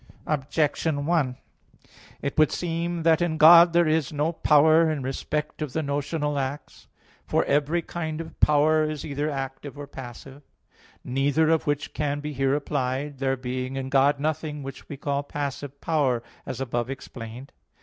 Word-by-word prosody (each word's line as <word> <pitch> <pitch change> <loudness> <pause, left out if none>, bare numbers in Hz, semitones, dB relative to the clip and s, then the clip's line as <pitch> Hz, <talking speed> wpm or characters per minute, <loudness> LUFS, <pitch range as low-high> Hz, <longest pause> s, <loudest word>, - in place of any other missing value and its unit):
Objection 150 0 0
1: 145 -7 +1 0.9
It 140 - -2
would 155 -1 +4
seem 170 0 -2
that 165 +1 +4
in 170 -2 0
God 170 +2 +9
there 170 0 +3
is 155 -3 +1
no 150 +2 0
power 160 0 +4
in 150 -4 -2
respect 150 +4 -3
of 150 -4 -3
the 160 - -1
notional 145 +1 -1
acts. 135 +2 -6 0.4
For - - +1
every 150 +4 +1
kind 160 -2 -4
of 165 -1 -8
power 155 +1 +4
is 155 -2 -5
either 145 +1 -2
active 135 0 -5
or 145 - -6
passive; 135 +1 -10 0.6
neither 145 +5 +2
of 160 -2 +1
which 145 0 -1
can 145 -1 -1
be 150 +1 -5
here 135 0 +1
applied, 140 -1 -2
there 135 0 0
being 130 +1 -4
in 135 0 -4
God 140 +1 +3
nothing 150 -1 -2
which 135 0 -9
we 145 - -6
call 140 0 -1
passive 140 -1 -5
power, 135 -7 +1 0.2
as 130 - -5
above 120 -2 -2
explained 125 -1 -8
(Q. - - -34
145 Hz, 165 wpm, -25 LUFS, 135-155 Hz, 0.9 s, God